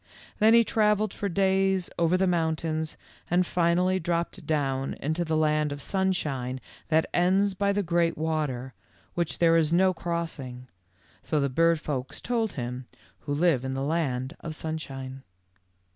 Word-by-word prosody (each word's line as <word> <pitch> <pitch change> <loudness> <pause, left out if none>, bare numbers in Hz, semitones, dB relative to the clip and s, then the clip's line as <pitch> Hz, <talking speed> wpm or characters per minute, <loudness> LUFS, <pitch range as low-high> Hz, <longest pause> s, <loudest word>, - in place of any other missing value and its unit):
Then 220 +1 +6
he 235 - +7
travelled 210 -2 +2
for 200 - -3
days 190 0 +2
over 170 +2 +3
the 190 - +2
mountains 160 -2 -1 0.3
and 180 +1 +3
finally 180 +2 +2
dropped 170 0 -2
down 135 -3 0
into 160 +4 -2
the 160 -1 0
land 150 -1 +2
of 145 - -5
sunshine 145 -9 -1 0.3
that 160 0 +3
ends 190 +3 +3
by 200 +1 +1
the 205 0 0
great 170 -1 +1
water 150 -5 -2 0.4
which 170 -2 -2
there 165 -1 +4
is 160 -2 +3
no 185 +2 +4
crossing, 165 -8 -4 0.5
so 155 - 0
the 140 -1 +1
bird 165 +4 +3
folks 135 -4 -4
told 230 -3 -1
him 125 0 -5 0.3
who 145 - -4
live 155 -5 +2
in 130 0 -3
the 135 - -2
land 140 -4 -1
of 160 -2 -6
sunshine. 135 -5 -6
165 Hz, 155 wpm, -27 LUFS, 145-185 Hz, 0.5 s, he